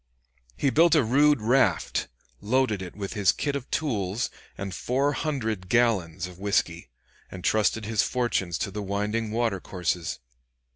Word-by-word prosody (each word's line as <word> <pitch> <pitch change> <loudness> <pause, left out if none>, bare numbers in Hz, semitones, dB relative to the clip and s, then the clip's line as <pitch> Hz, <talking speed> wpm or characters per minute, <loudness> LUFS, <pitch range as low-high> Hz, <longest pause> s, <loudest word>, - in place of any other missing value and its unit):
He 140 - +1
built 165 +2 +5
a 150 - +5
rude 145 +3 +4
raft, 110 - +2 0.3
loaded 110 -2 +1
it 90 -2 -8
with 100 -1 -5
his 100 -4 +3
kit 145 -1 -2
of 140 -2 -5
tools 110 -6 -1 0.3
and 95 -1 -5
four 135 +7 0
hundred 110 - -2
gallons 95 -8 +2
of 90 0 -11
whisky, 90 -6 0 0.4
and 90 -1 -9
trusted 110 0 +2
his 110 0 +1
fortunes 115 -9 0
to 100 - -3
the 105 +2 -4
winding 105 +3 -2
water 115 -3 0
courses. 90 -2 -2
110 Hz, 150 wpm, -26 LUFS, 95-125 Hz, 0.4 s, built